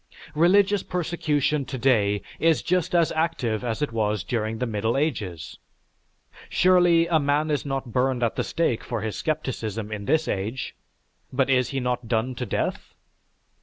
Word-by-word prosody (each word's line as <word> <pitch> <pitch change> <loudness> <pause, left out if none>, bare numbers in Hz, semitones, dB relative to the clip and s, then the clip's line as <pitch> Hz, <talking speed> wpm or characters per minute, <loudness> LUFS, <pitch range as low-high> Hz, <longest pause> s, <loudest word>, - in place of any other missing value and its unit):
Religious 195 +5 +4
persecution 155 -4 0
today 115 -6 +1 0.2
is 165 -1 +3
just 180 0 0
as 170 -2 +3
active 145 -9 -1
as 120 +4 -2
it 145 - -2
was 105 -3 0
during 110 0 -2
the 125 - -1
Middle 110 +1 -1
Ages. 105 - -3 0.9
Surely, 175 -2 +4
a 170 -2 +2
man 145 +2 +1
is 145 -1 -1
not 135 -3 -3
burned 125 0 +1
at 115 - 0
the - - 0
stake 165 -9 -1
for 120 -3 -3
his 110 0 -3
scepticism 115 -8 -3
in 105 -1 -5
this 160 +7 +2
age; 110 +7 -3 0.6
but 135 +1 +1
is 125 -1 +2
he 135 - -2
not 125 -1 -2
done 115 +2 0
to 120 - -5
death? - - -3
130 Hz, 160 wpm, -25 LUFS, 110-160 Hz, 0.9 s, Religious